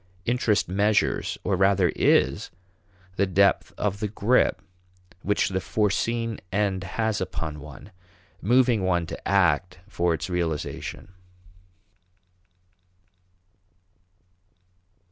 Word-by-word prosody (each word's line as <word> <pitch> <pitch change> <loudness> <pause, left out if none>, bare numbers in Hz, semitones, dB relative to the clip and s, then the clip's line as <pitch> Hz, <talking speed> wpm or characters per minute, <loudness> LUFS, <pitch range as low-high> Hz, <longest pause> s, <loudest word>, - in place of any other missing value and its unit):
Interest 120 -3 +1
measures 100 +3 +1
or 100 - +1
rather 95 -1 +3
is - - +2 0.7
the 100 - +2
depth 100 +2 +2
of 100 -1 -1
the 105 - -1
grip 110 +4 +2 0.6
which 105 0 +1
the 95 -1 -2
foreseen 115 +3 -1
end 100 -2 0
has 110 -2 -2
upon 80 -4 -4
one, 75 +6 -12 0.5
moving 120 -1 +3
one 90 -2 +1
to - - -7
act 90 -2 +2
for 85 -4 0
its 80 +1 -5
realization. 90 +1 -4
100 Hz, 95 wpm, -25 LUFS, 90-105 Hz, 0.7 s, rather